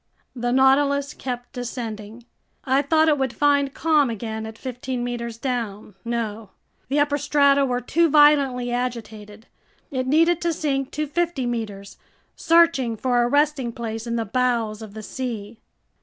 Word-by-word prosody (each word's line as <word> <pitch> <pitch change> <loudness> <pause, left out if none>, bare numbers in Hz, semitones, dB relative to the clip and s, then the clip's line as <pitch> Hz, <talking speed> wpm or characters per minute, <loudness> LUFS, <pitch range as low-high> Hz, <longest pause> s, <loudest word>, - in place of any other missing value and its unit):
The 245 0 -2
Nautilus 280 +2 +3
kept 245 -2 -6
descending. 230 -2 -6 0.4
I 265 +1 +3
thought 315 +2 +3
it 295 -2 +3
would 265 -2 0
find 285 -1 +2
calm 300 -3 +2
again 220 -1 -5
at 220 0 -10
fifteen 250 0 -5
meters 235 -2 -4
down. 230 -5 -4
No. 225 -3 -4 0.4
The 280 +3 0
upper 290 0 +1
strata 280 -1 +3
were 250 -1 -1
too 335 +6 +2
violently 280 -5 +4
agitated. 225 -3 -5 0.5
It 260 -2 -2
needed 330 +4 +3
to 340 -1 0
sink 275 -3 -1
to 305 - -1
fifty 325 -2 -1
meters, 210 -5 -5 0.4
searching 330 -9 +3
for 245 +1 +1
a 240 - +2
resting 285 -2 +1
place 225 0 -5
in 235 - -2
the 230 -1 -1
bowels 230 -2 0
of 215 -2 -10
the 215 - -7
sea. 225 -3 -6
250 Hz, 155 wpm, -23 LUFS, 230-285 Hz, 0.5 s, violently